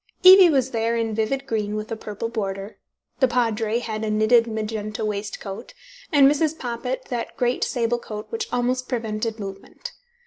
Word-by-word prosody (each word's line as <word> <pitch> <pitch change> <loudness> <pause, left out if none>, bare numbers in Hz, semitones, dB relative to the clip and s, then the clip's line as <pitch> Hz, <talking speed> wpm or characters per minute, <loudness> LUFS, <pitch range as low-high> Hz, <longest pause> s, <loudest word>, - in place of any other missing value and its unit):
Evie 375 -1 +10
was 265 -4 +1
there 230 0 0
in 225 -1 -1
vivid 245 +6 -1
green 215 -4 -2
with 215 +1 -5
a - - -1
purple 215 0 -5
border, 200 -2 -4 0.4
the 260 - +5
Padre 230 -2 0
had 220 -2 -4
a 220 - -1
knitted 220 +2 +4
magenta 215 -1 -3
waistcoat, 200 -1 -5 0.4
and 285 -3 +6
Mrs. 305 +2 +1
Poppit 250 +1 -4
that 240 -2 -4
great 245 0 +1
sable 240 -1 0
coat 210 -2 -7
which 455 0 -4
almost 250 +1 -1
prevented 225 -2 -2
movement. 195 - -8
230 Hz, 165 wpm, -23 LUFS, 215-250 Hz, 0.4 s, Evie